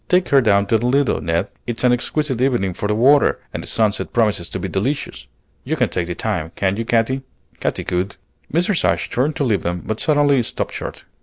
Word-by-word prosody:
Take 180 Hz, 0 st, +3 dB
her 140 Hz, -1 st, +5 dB
down 100 Hz, -4 st, +3 dB
to 110 Hz, +2 st, +2 dB
the 120 Hz, -, -1 dB
Lido, 135 Hz, -, +2 dB
Ned. 85 Hz, +5 st, -1 dB, 0.2 s
It's 120 Hz, 0 st, -3 dB
an 125 Hz, -1 st, +5 dB
exquisite 130 Hz, +1 st, -1 dB
evening 120 Hz, -8 st, +1 dB
for 105 Hz, -, -3 dB
the 105 Hz, -, +1 dB
water, 140 Hz, +6 st, +4 dB, 0.2 s
and -, -, -4 dB
the -, -, -8 dB
sunset 110 Hz, -2 st, 0 dB
promises 105 Hz, -7 st, +1 dB
to -, -, -4 dB
be 95 Hz, -, -3 dB
delicious. 105 Hz, -, -3 dB, 0.4 s
You 155 Hz, +5 st, -1 dB
can 125 Hz, -8 st, +1 dB
take 85 Hz, 0 st, -2 dB
the 90 Hz, -, -4 dB
time, 90 Hz, -7 st, -2 dB
can't 100 Hz, +2 st, 0 dB
you, 115 Hz, -, -2 dB
Katy?" 120 Hz, +3 st, +1 dB, 0.4 s
Katy -, -, -2 dB
could. 90 Hz, +3 st, -2 dB, 0.4 s
Mrs. 175 Hz, +3 st, +1 dB
Ashe -, -, +1 dB
turned 140 Hz, +5 st, 0 dB
to -, -, -1 dB
leave 105 Hz, -9 st, +1 dB
them, 90 Hz, 0 st, -3 dB
but 110 Hz, +1 st, -3 dB
suddenly 145 Hz, -3 st, +3 dB
stopped 115 Hz, -, -3 dB
short. -, -, -7 dB
115 Hz, 220 wpm, -20 LUFS, 95-135 Hz, 0.4 s, her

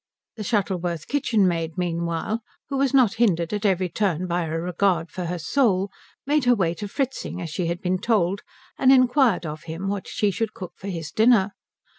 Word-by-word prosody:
The 215 Hz, -, -5 dB
Shuttleworth 180 Hz, -6 st, -1 dB
kitchenmaid 185 Hz, -, +1 dB
meanwhile, 170 Hz, +5 st, -2 dB, 0.3 s
who 275 Hz, -, -2 dB
was 270 Hz, -1 st, +2 dB
not 255 Hz, -7 st, +4 dB
hindered 170 Hz, -6 st, +2 dB
at 210 Hz, 0 st, +1 dB
every 185 Hz, -1 st, +1 dB
turn 180 Hz, -1 st, -1 dB
by 175 Hz, -1 st, -1 dB
a -, -, -5 dB
regard 175 Hz, -1 st, 0 dB
for 180 Hz, -, -4 dB
her 175 Hz, +1 st, -2 dB
soul, 195 Hz, -, +1 dB, 0.3 s
made 290 Hz, -1 st, +2 dB
her 245 Hz, 0 st, +5 dB
way 170 Hz, -6 st, +1 dB
to 205 Hz, +3 st, -6 dB
Fritzing 265 Hz, -4 st, -3 dB
as 170 Hz, -3 st, -5 dB
she 175 Hz, +2 st, -2 dB
had 170 Hz, +1 st, -3 dB
been 185 Hz, 0 st, 0 dB
told 200 Hz, -3 st, +1 dB, 0.4 s
and 265 Hz, -1 st, +6 dB
inquired 255 Hz, -, +4 dB
of 155 Hz, +1 st, -6 dB
him 165 Hz, +4 st, -5 dB
what 200 Hz, -1 st, -3 dB
she 205 Hz, -1 st, 0 dB
should 220 Hz, +2 st, -3 dB
cook 185 Hz, -2 st, -7 dB
for 195 Hz, -, -9 dB
his 165 Hz, -6 st, -5 dB
dinner. 215 Hz, -2 st, +4 dB
190 Hz, 190 wpm, -24 LUFS, 170-225 Hz, 0.4 s, and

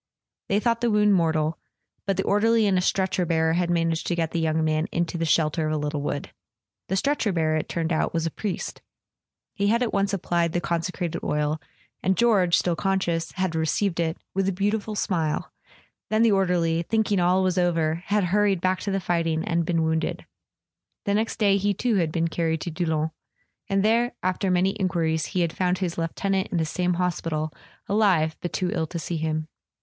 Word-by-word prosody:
They 200 Hz, -, +3 dB
thought 230 Hz, +1 st, 0 dB
the 240 Hz, -, +2 dB
wound 210 Hz, -1 st, +4 dB
mortal; 160 Hz, -3 st, +1 dB, 0.5 s
but 195 Hz, -, +1 dB
the -, -, +1 dB
or¬ 205 Hz, +1 st, +2 dB
derly 225 Hz, -1 st, +4 dB
and 195 Hz, -, +2 dB
a 180 Hz, -, +3 dB
stretcher 190 Hz, 0 st, +1 dB
bearer 160 Hz, -1 st, +1 dB
had 175 Hz, 0 st, 0 dB
managed 165 Hz, -1 st, 0 dB
to 175 Hz, -, 0 dB
get 165 Hz, -2 st, -1 dB
the 170 Hz, -, -1 dB
young 160 Hz, 0 st, +1 dB
man 155 Hz, +1 st, +1 dB
into 170 Hz, 0 st, -1 dB
the 165 Hz, -1 st, -1 dB
shelter 155 Hz, 0 st, +2 dB
of 155 Hz, -, -1 dB
a -, -, 0 dB
little 150 Hz, 0 st, -2 dB
wood. 145 Hz, 0 st, -3 dB, 0.6 s
The 190 Hz, -, -1 dB
stretcher 255 Hz, 0 st, +1 dB
bearer, 160 Hz, -3 st, +1 dB
it 155 Hz, -, -2 dB
turned 165 Hz, -1 st, -1 dB
out, 155 Hz, -, 0 dB
was 165 Hz, -1 st, -1 dB
a 165 Hz, -, -1 dB
priest. 205 Hz, +2 st, -4 dB, 0.7 s
He 200 Hz, 0 st, 0 dB
had 235 Hz, +4 st, +3 dB
at 235 Hz, -, -2 dB
once 200 Hz, 0 st, +1 dB
applied 170 Hz, -3 st, 0 dB
the 175 Hz, -, +1 dB
consecrated 170 Hz, 0 st, -2 dB
oil, 150 Hz, +1 st, -1 dB, 0.4 s
and 190 Hz, 0 st, +1 dB
George, 200 Hz, -8 st, +4 dB
still 175 Hz, -2 st, +1 dB
conscious, 175 Hz, -3 st, -1 dB
had 185 Hz, -3 st, -1 dB
received 165 Hz, +3 st, 0 dB
it 165 Hz, -1 st, 0 dB, 0.2 s
"with 195 Hz, 0 st, +1 dB
a -, -, +1 dB
beautiful 205 Hz, +3 st, -1 dB
smile"; 165 Hz, -7 st, -1 dB, 0.6 s
then 215 Hz, +1 st, +3 dB
the 230 Hz, -, +5 dB
orderly, 175 Hz, -4 st, +2 dB
thinking 210 Hz, +1 st, +1 dB
all 180 Hz, +2 st, +3 dB
was 185 Hz, 0 st, +1 dB
over, 165 Hz, -2 st, +1 dB
had 205 Hz, 0 st, +2 dB
hurried 195 Hz, +1 st, +2 dB
back 185 Hz, +1 st, +1 dB
to 200 Hz, -, -4 dB
the 195 Hz, 0 st, 0 dB
fighting, 165 Hz, -3 st, 0 dB
and 170 Hz, -1 st, 0 dB
been 165 Hz, -2 st, +1 dB
wounded. 160 Hz, 0 st, -1 dB, 0.8 s
The 200 Hz, -, +1 dB
next 220 Hz, +2 st, 0 dB
day 200 Hz, -4 st, +3 dB
he 200 Hz, 0 st, 0 dB
too 230 Hz, +1 st, +1 dB
had 165 Hz, -4 st, +1 dB
been 165 Hz, 0 st, 0 dB
carried 160 Hz, -1 st, -1 dB
to 170 Hz, -, -4 dB
Doullens; 160 Hz, -1 st, -1 dB, 0.6 s
and 195 Hz, 0 st, +2 dB
there, 235 Hz, +3 st, +2 dB
after 185 Hz, +1 st, 0 dB
many 185 Hz, +2 st, +2 dB
enquiries, 165 Hz, -4 st, 0 dB
he 180 Hz, -, -1 dB
had 165 Hz, -2 st, 0 dB
found 180 Hz, 0 st, 0 dB
his 180 Hz, -3 st, -2 dB
lieutenant 190 Hz, +4 st, -1 dB
in 180 Hz, -, -2 dB
the 160 Hz, -, +1 dB
same 180 Hz, +3 st, 0 dB
hospital, 165 Hz, -3 st, -2 dB, 0.3 s
alive, 190 Hz, -7 st, +2 dB
but 175 Hz, -, -3 dB
too 180 Hz, -1 st, -1 dB
ill 160 Hz, -2 st, -1 dB
to 170 Hz, -, -5 dB
see 170 Hz, +1 st, -3 dB
him. 155 Hz, 0 st, -2 dB
175 Hz, 205 wpm, -25 LUFS, 160-195 Hz, 0.8 s, the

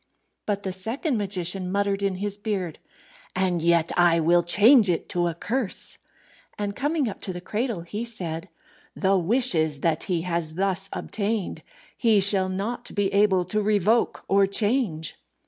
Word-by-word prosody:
But 205 Hz, -1 st, -1 dB
the 190 Hz, -, -2 dB
second 230 Hz, -, -2 dB
magician 185 Hz, -2 st, -1 dB
muttered 200 Hz, 0 st, 0 dB
in 195 Hz, -1 st, 0 dB
his 200 Hz, +2 st, -3 dB
beard, 200 Hz, -6 st, -4 dB, 0.6 s
"And 185 Hz, -2 st, +1 dB
yet 170 Hz, 0 st, +3 dB
I 175 Hz, -1 st, +4 dB
will 170 Hz, +2 st, +4 dB
change 210 Hz, +6 st, +5 dB
it 170 Hz, -, -1 dB
to 175 Hz, -1 st, 0 dB
a 170 Hz, -, -3 dB
curse." 230 Hz, +4 st, -2 dB, 0.6 s
And 205 Hz, -1 st, -3 dB
coming 290 Hz, 0 st, 0 dB
up 205 Hz, -, -6 dB
to 190 Hz, -, -3 dB
the 180 Hz, -, -6 dB
cradle, 215 Hz, +1 st, -3 dB
he 205 Hz, +7 st, -5 dB
said, 180 Hz, -6 st, -4 dB, 0.5 s
"The 195 Hz, -1 st, +2 dB
wishes 170 Hz, -, +2 dB
that 165 Hz, -2 st, 0 dB
he 175 Hz, -4 st, 0 dB
has 170 Hz, -3 st, -2 dB
thus 195 Hz, +1 st, -1 dB
obtained 215 Hz, -2 st, -2 dB, 0.3 s
he 225 Hz, -4 st, +3 dB
shall 195 Hz, -1 st, +2 dB
not 200 Hz, +6 st, -4 dB
be 205 Hz, -2 st, 0 dB
able 200 Hz, -3 st, +3 dB
to 210 Hz, +4 st, 0 dB
revoke 210 Hz, +2 st, +1 dB
or 195 Hz, 0 st, +4 dB
change." 200 Hz, -6 st, 0 dB
195 Hz, 160 wpm, -25 LUFS, 175-210 Hz, 0.6 s, change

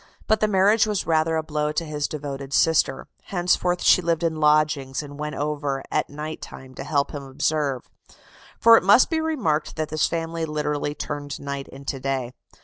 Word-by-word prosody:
But 220 Hz, -, +2 dB
the 215 Hz, -, +2 dB
marriage 205 Hz, +2 st, +4 dB
was 210 Hz, -2 st, -1 dB
rather 160 Hz, 0 st, +2 dB
a 160 Hz, -, 0 dB
blow 150 Hz, -1 st, -1 dB
to 165 Hz, -, -1 dB
his 150 Hz, -1 st, -2 dB
devoted 140 Hz, -2 st, -6 dB
sister: 160 Hz, -4 st, +2 dB, 0.2 s
henceforth 180 Hz, -1 st, 0 dB
she -, -, +6 dB
lived 170 Hz, -1 st, 0 dB
in 160 Hz, -2 st, 0 dB
lodgings, 150 Hz, -3 st, +2 dB
and 145 Hz, 0 st, -10 dB
went 150 Hz, 0 st, -4 dB
over 145 Hz, -2 st, -2 dB
at -, -, 0 dB
night 150 Hz, +2 st, -6 dB
time 130 Hz, 0 st, -10 dB
to -, -, -7 dB
help 140 Hz, -2 st, 0 dB
him 145 Hz, -, -5 dB
observe. 140 Hz, -1 st, -1 dB, 0.7 s
For 230 Hz, 0 st, +8 dB
it -, -, +1 dB
must 205 Hz, -, +5 dB
be 320 Hz, -1 st, +1 dB
remarked 235 Hz, -, -1 dB
that 155 Hz, -1 st, -3 dB
this 155 Hz, 0 st, +1 dB
family 165 Hz, 0 st, -3 dB
literally 150 Hz, -1 st, -2 dB
turned 145 Hz, -2 st, -5 dB
night 140 Hz, -1 st, -5 dB
into 135 Hz, 0 st, -6 dB
day. 130 Hz, -2 st, -2 dB
150 Hz, 185 wpm, -24 LUFS, 140-165 Hz, 0.7 s, For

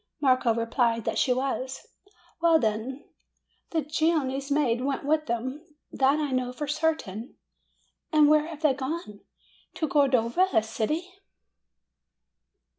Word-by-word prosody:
Marco 255 Hz, -4 st, +3 dB
replied 230 Hz, 0 st, 0 dB
that 225 Hz, -, -1 dB
she 255 Hz, -, +2 dB
was. 260 Hz, 0 st, -2 dB, 0.6 s
"Well, 335 Hz, -1 st, +5 dB
then, 235 Hz, +2 st, -2 dB, 0.6 s
the 320 Hz, -2 st, -1 dB
Genoese 300 Hz, -3 st, 0 dB
maid 275 Hz, -5 st, +1 dB
went 275 Hz, +1 st, -2 dB
with 305 Hz, +1 st, +1 dB
them; 255 Hz, +6 st, -3 dB, 0.3 s
that 270 Hz, +2 st, +2 dB
I 295 Hz, -2 st, -1 dB
know 255 Hz, -1 st, -1 dB
for 275 Hz, +4 st, -5 dB
certain." 295 Hz, -8 st, -2 dB, 0.8 s
"And 305 Hz, -2 st, +5 dB
where 305 Hz, +1 st, +4 dB
have 320 Hz, -1 st, -9 dB
they 300 Hz, -3 st, +4 dB
gone?" 260 Hz, -5 st, -5 dB, 0.6 s
"To 315 Hz, -, -1 dB
Cordova, 275 Hz, +3 st, +3 dB
a 220 Hz, -, +4 dB
city." 235 Hz, +10 st, -2 dB
270 Hz, 125 wpm, -27 LUFS, 240-305 Hz, 0.8 s, Well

